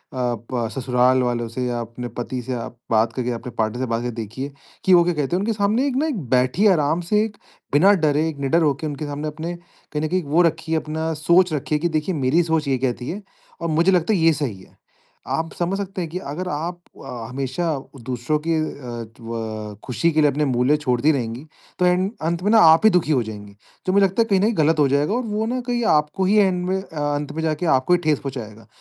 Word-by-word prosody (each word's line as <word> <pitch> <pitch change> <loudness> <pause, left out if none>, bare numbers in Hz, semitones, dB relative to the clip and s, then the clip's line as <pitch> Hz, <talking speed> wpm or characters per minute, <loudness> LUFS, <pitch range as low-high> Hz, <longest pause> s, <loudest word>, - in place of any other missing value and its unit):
प 120 -1 -2
ससुराल 125 0 +2
वालों 120 -1 -1
से 125 +2 -3
या 120 -1 -2
अपने 115 +2 -6
पति 125 +1 -3
से 130 - -4
आप 120 0 -6
बात 115 +1 +3
करके 125 0 -2
अपने 120 +2 -5
पार्टनर 110 +2 -1
से - - 0
बात 115 0 0
करके 120 0 -3
देखिए 115 +5 -5 0.3
कि 190 - +5
वो 175 - +7
क्या 175 +1 +1
कहते 150 +1 -1
हैं। - - +1
उनके 225 +3 0
सामने 215 +6 +1
एक 260 - -2
ना 315 - 0 0.3
बैठिए 130 +12 +3
आराम 155 +2 +1
से 210 0 +4
एक 210 -2 -5 0.4
बिना 190 +8 +6
डरे 155 +2 +2
निडर 140 +5 +2
होके 150 +1 0
उनके 150 +1 -5
सामने 145 +1 -4
अपने 160 +3 -5
कहीं 170 -3 -8
न - - 0
कहीं 185 -1 0
वो 150 +5 +2
रखिए 165 -1 +1
अपना 160 +1 -2
सोच 175 0 +4
रखिए 150 +1 -1
कि 175 +3 0
देखिए 165 +4 -2
मेरी 150 +5 +2
सोच 160 -2 0
ये 135 -1 +2
कहती 125 -1 -2
है, 200 +5 -4 0.4
और 170 - -1
मुझे 165 +4 +3
लगता 180 +3 +2
है 190 - +2
ये 165 0 +5
सही 125 -11 -4
है। - - -20 0.5
आप 160 0 -2
समझ 180 +3 -1
सकते 195 -2 -4
हैं 165 - -4
कि 175 - -4
अगर 155 +6 -5
आप 170 +4 -3 0.3
अ, 115 -2 -6
हमेशा 135 +5 -3 0.4
दूसरों 125 +4 -1
की 165 - +2
अ, 155 - +1 0.5
त्व 110 -2 -6
खुशी 165 +6 +1
के 155 0 +2
लिए 150 - +5
अपने 150 +2 0
मूल्य 130 +3 +2
छोड़ती 140 +1 +2
रहेंगी, 125 0 -3 0.3
तो 180 - +3
एंड 180 +2 +2
अंत 170 +2 -1
में 205 - +2
ना 225 - +7
आप 165 +7 +4
ही - - +9
दुखी 175 -4 +2
हो 130 -4 +3
जाएँगी। 105 -2 -9 0.3
तो 185 - +1
मुझे 200 0 +5
लगता 195 +5 +1
है - - +3
कहीं 195 -2 +4
न 195 - +1
कहीं 220 -2 +1
गलत 155 +1 +3
हो 145 - +5
जाएगा 145 +7 +1
और 250 - 0
वो 215 0 -1
ना 255 +1 -1
कहीं 240 -1 0
आपको 150 +6 0
ही 205 +3 +3
एंड 185 -3 +3
में 190 - +1
अंत 145 -3 -3
में 160 - -3
जाके 155 +2 -1
आपको 130 +7 +1
ही 175 - +4
ठेस 150 -3 +2
पहुँचाएगा। 115 -6 -7
150 Hz, 235 wpm, -22 LUFS, 125-175 Hz, 0.5 s, ही